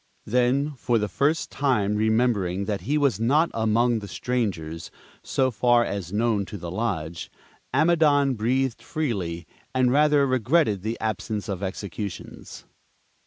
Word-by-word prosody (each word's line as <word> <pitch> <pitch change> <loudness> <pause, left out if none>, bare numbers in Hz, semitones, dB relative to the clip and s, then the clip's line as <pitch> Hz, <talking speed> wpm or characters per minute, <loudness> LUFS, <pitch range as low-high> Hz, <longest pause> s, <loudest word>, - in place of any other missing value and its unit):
Then, 125 +5 +1
for 120 0 +1
the 105 -1 0
first 145 +9 0
time 110 -7 +1
remembering 105 -4 +1
that 100 -1 -2
he 150 +2 0
was 140 -9 +1
not 145 +9 +2
among 115 +1 +2
the 100 - -8
strangers, 90 -11 -3 0.3
so 130 -1 0
far 120 +1 +3
as 95 -4 -4
known 110 -1 +1
to 105 - -7
the 85 -2 -7
lodge, 85 -6 -3 0.4
Amidon 150 -3 +3
breathed 125 +2 0
freely, 95 - -3 0.3
and 130 -1 +3
rather 145 0 +4
regretted 130 - +2
the 110 +3 -4
absence 110 0 -3
of 100 -2 -4
executions. 100 -1 -6
115 Hz, 135 wpm, -25 LUFS, 100-130 Hz, 0.4 s, rather